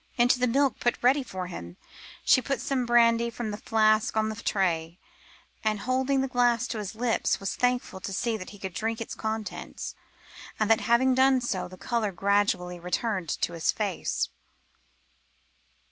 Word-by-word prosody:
Into 245 Hz, +1 st, +4 dB
the 250 Hz, -, +2 dB
milk 275 Hz, +2 st, +2 dB
put 240 Hz, -, +1 dB
ready 265 Hz, +4 st, +4 dB
for 185 Hz, -8 st, -5 dB
him, 90 Hz, -, -8 dB, 0.5 s
she 255 Hz, -, +6 dB
poured 275 Hz, +1 st, -2 dB
some 265 Hz, -4 st, -1 dB
brandy 235 Hz, 0 st, +4 dB
from 230 Hz, -2 st, -4 dB
a -, -, -4 dB
flask 215 Hz, 0 st, +2 dB
on 220 Hz, 0 st, +2 dB
the 215 Hz, -, -4 dB
tray, 175 Hz, -6 st, -1 dB, 0.7 s
and, 215 Hz, -2 st, 0 dB
holding 260 Hz, +2 st, +1 dB
the 270 Hz, -, 0 dB
glass 245 Hz, -2 st, +2 dB
to 225 Hz, -, -3 dB
his 210 Hz, 0 st, -5 dB
lips, 235 Hz, 0 st, 0 dB
was 195 Hz, -, -3 dB
thankful 245 Hz, -6 st, 0 dB
to 190 Hz, -, -5 dB
see 230 Hz, +4 st, -1 dB
that 185 Hz, -4 st, -7 dB
he 205 Hz, -, -12 dB
could 190 Hz, -2 st, -6 dB
drink 225 Hz, +4 st, -2 dB
its 230 Hz, -, -5 dB
contents, 220 Hz, -1 st, -5 dB, 0.7 s
and 215 Hz, 0 st, +2 dB
that 225 Hz, -, +4 dB
having 235 Hz, +4 st, +3 dB
done 260 Hz, 0 st, +4 dB
so, 225 Hz, -7 st, -2 dB
the 185 Hz, +1 st, -12 dB
colour 225 Hz, 0 st, -1 dB
gradually 195 Hz, -2 st, +1 dB
returned 180 Hz, 0 st, -2 dB
to 170 Hz, -, -1 dB
his 165 Hz, -1 st, +1 dB
face. 205 Hz, -4 st, -2 dB
220 Hz, 175 wpm, -27 LUFS, 195-245 Hz, 0.7 s, she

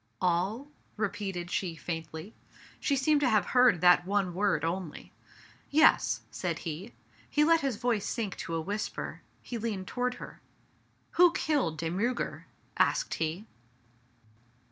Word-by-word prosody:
" 115 Hz, -, -43 dB
All? 185 Hz, +9 st, 0 dB, 0.2 s
" -, -, -37 dB
repeated 190 Hz, -3 st, -4 dB
she 175 Hz, -4 st, -1 dB
faintly. 160 Hz, +4 st, -6 dB, 0.5 s
She 280 Hz, -, +1 dB
seemed 290 Hz, +2 st, +3 dB
to 265 Hz, -, +3 dB
have 210 Hz, -5 st, +3 dB
heard 250 Hz, -9 st, +4 dB
that 180 Hz, 0 st, +6 dB
one 195 Hz, -1 st, 0 dB
word 180 Hz, -5 st, +1 dB
only. 170 Hz, -1 st, -4 dB, 0.3 s
" -, -, -22 dB, 0.3 s
Yes," 310 Hz, +2 st, +4 dB
said -, -, -2 dB
he. 170 Hz, +8 st, -6 dB, 0.3 s
He 300 Hz, -, +3 dB
let 330 Hz, +1 st, +4 dB
his 270 Hz, -4 st, 0 dB
voice 230 Hz, -2 st, 0 dB
sink 215 Hz, -6 st, -2 dB
to 165 Hz, -, -4 dB
a 165 Hz, -, -1 dB
whisper, 205 Hz, +6 st, -4 dB, 0.2 s
he 235 Hz, -, -5 dB
leaned 210 Hz, -4 st, -3 dB
toward 250 Hz, +4 st, -1 dB
her. -, -, -10 dB, 0.3 s
" -, -, -39 dB
Who 355 Hz, -1 st, +8 dB
killed 270 Hz, -, 0 dB
De 165 Hz, +1 st, -2 dB
Miirger? 235 Hz, +7 st, -2 dB, 0.2 s
" -, -, -35 dB
asked -, -, +2 dB
he. 165 Hz, +6 st, -2 dB
200 Hz, 160 wpm, -30 LUFS, 175-250 Hz, 0.5 s, Who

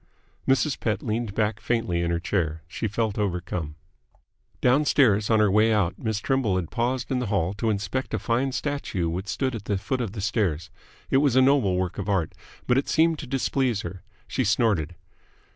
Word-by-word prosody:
Mrs. 135 Hz, +2 st, +2 dB
Pett 105 Hz, -3 st, -1 dB
leaned 110 Hz, -2 st, -2 dB
back 110 Hz, 0 st, 0 dB
faintly 115 Hz, -8 st, 0 dB
in 85 Hz, -, 0 dB
her 85 Hz, 0 st, 0 dB
chair. 80 Hz, -3 st, -1 dB
She 85 Hz, +7 st, -3 dB
felt 110 Hz, 0 st, -1 dB
overcome. 90 Hz, -5 st, -2 dB, 0.8 s
Downstairs, 125 Hz, -6 st, +3 dB
on 110 Hz, -1 st, +4 dB
her 105 Hz, -2 st, +4 dB
way 110 Hz, +2 st, +4 dB
out, 100 Hz, -5 st, +1 dB
Miss 110 Hz, -2 st, -1 dB
Trimble 130 Hz, -5 st, +1 dB
had 90 Hz, -3 st, -2 dB
paused 125 Hz, +2 st, -1 dB
in 130 Hz, -, +1 dB
the 125 Hz, -, -2 dB
hall 95 Hz, -3 st, 0 dB
to 105 Hz, +3 st, -1 dB
inspect 100 Hz, +5 st, -2 dB
a -, -, 0 dB
fine 125 Hz, +3 st, 0 dB
statue 130 Hz, -, -2 dB
which 90 Hz, +4 st, -3 dB
stood 130 Hz, +5 st, -1 dB
at 110 Hz, -3 st, -6 dB
the 100 Hz, -, 0 dB
foot 125 Hz, +7 st, -2 dB
of 110 Hz, -5 st, -3 dB
the 105 Hz, -, -5 dB
stairs. 90 Hz, -6 st, -1 dB, 0.4 s
It -, -, +5 dB
was 140 Hz, -3 st, +3 dB
a 130 Hz, -, +6 dB
noble 130 Hz, -9 st, +3 dB
work 90 Hz, +1 st, -2 dB
of 100 Hz, +1 st, -3 dB
art, 95 Hz, -6 st, 0 dB, 0.3 s
but 125 Hz, +2 st, +3 dB
it 140 Hz, -, -4 dB
seemed 160 Hz, -1 st, +3 dB
to 145 Hz, -, -7 dB
displease 130 Hz, -4 st, 0 dB
her. 90 Hz, +1 st, -7 dB, 0.3 s
She 130 Hz, -, -1 dB
snorted. 105 Hz, -, +1 dB
110 Hz, 195 wpm, -25 LUFS, 95-125 Hz, 0.8 s, a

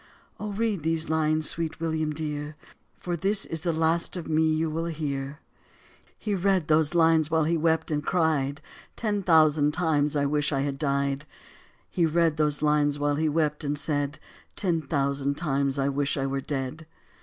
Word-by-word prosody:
"Oh, 210 Hz, 0 st, -4 dB
read 210 Hz, -3 st, -1 dB
these 160 Hz, +1 st, -1 dB
lines, 155 Hz, -1 st, +1 dB
sweet 165 Hz, -1 st, -3 dB
William 160 Hz, -1 st, -1 dB
dear. 150 Hz, -1 st, -4 dB, 0.4 s
For 175 Hz, -1 st, -3 dB
this 195 Hz, +4 st, 0 dB
is 165 Hz, -2 st, -5 dB
the 170 Hz, 0 st, 0 dB
last 165 Hz, +2 st, 0 dB
of 170 Hz, -, -6 dB
me 160 Hz, 0 st, +2 dB
you 160 Hz, +1 st, +1 dB
will 165 Hz, +2 st, -2 dB
hear." 145 Hz, -2 st, -4 dB, 0.8 s
He 210 Hz, -, -3 dB
read 190 Hz, -3 st, +1 dB
those 155 Hz, +1 st, +3 dB
lines 160 Hz, -2 st, +4 dB
while 160 Hz, -1 st, +2 dB
he 165 Hz, +3 st, +1 dB
wept 160 Hz, 0 st, +1 dB
and 150 Hz, -1 st, -1 dB
cried, 155 Hz, -5 st, 0 dB, 0.3 s
"Ten 210 Hz, -3 st, -1 dB
thousand 155 Hz, -4 st, +4 dB
times 150 Hz, -4 st, +1 dB
I 140 Hz, -1 st, +2 dB
wish 145 Hz, +1 st, 0 dB
I 135 Hz, -2 st, 0 dB
had 140 Hz, -1 st, -3 dB
died", 140 Hz, 0 st, -1 dB, 0.6 s
He 170 Hz, -3 st, +1 dB
read 165 Hz, -1 st, +2 dB
those 150 Hz, -1 st, 0 dB
lines 150 Hz, -1 st, +2 dB
while 145 Hz, 0 st, +1 dB
he 155 Hz, 0 st, +1 dB
wept 150 Hz, 0 st, 0 dB
and 145 Hz, 0 st, -1 dB
said, 145 Hz, 0 st, -2 dB, 0.4 s
"Ten 170 Hz, -4 st, 0 dB
thousand 140 Hz, -1 st, -1 dB
times 140 Hz, -3 st, 0 dB
I 135 Hz, 0 st, +1 dB
wish 140 Hz, 0 st, 0 dB
I 135 Hz, -, 0 dB
were 135 Hz, 0 st, -2 dB
dead." 140 Hz, +3 st, -4 dB
155 Hz, 180 wpm, -26 LUFS, 145-165 Hz, 0.8 s, lines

